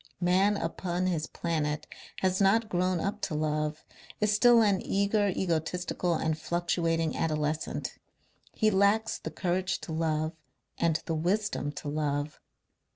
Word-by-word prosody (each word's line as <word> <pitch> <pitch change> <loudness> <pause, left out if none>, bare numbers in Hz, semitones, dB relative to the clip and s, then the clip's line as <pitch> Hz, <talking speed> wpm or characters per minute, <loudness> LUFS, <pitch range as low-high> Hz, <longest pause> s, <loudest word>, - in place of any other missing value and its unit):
Man 190 +3 +3
upon 175 +1 -2
his 165 -4 0
planet 155 -3 -2 0.4
has 185 +1 +1
not 215 +3 +3
grown 180 0 +1
up 205 +4 -2
to 155 - -2
love, 150 0 -1 0.4
is 210 0 +2
still 235 +2 +6
an 200 -3 +2
eager, 205 +1 +1
egotistical 175 0 -1
and 160 0 0
fluctuating 165 -1 0
adolescent. 155 -1 -2 0.5
He 215 -1 +2
lacks 200 +3 +2
the - - -5
courage 180 +3 -1
to - - -7
love 155 -1 0 0.5
and 165 -2 +2
the 165 - -2
wisdom 180 -1 0
to 150 - -7
love. 145 0 -2
175 Hz, 135 wpm, -29 LUFS, 155-195 Hz, 0.5 s, still